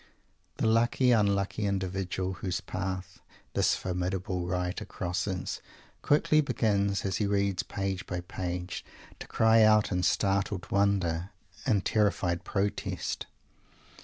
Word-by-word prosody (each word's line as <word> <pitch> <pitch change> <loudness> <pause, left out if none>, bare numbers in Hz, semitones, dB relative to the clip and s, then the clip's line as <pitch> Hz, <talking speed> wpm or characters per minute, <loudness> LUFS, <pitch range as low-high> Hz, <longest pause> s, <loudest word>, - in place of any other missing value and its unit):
The - - 0
lucky 120 +3 +3
unlucky 100 -1 +2
individual 95 -1 -2
whose 90 -1 -3
path 95 -1 -5 0.3
this - - +3
formidable 90 0 -2
writer 90 +3 -2
crosses, 90 -1 -3 0.4
quickly 155 +1 +4
begins, 100 -8 +1
as 95 -2 0
he 105 - 0
reads 100 -2 +1
page 95 -1 -3
by 90 -2 -3
page, 90 0 -4 0.4
to - - -8
cry 110 0 +4
out 110 -1 +5
in 90 -1 +1
startled 95 +1 0
wonder, 95 -3 +1 0.4
in 105 -6 +3
terrified 100 -5 +1
protest. 100 0 -2
95 Hz, 115 wpm, -29 LUFS, 90-105 Hz, 0.4 s, out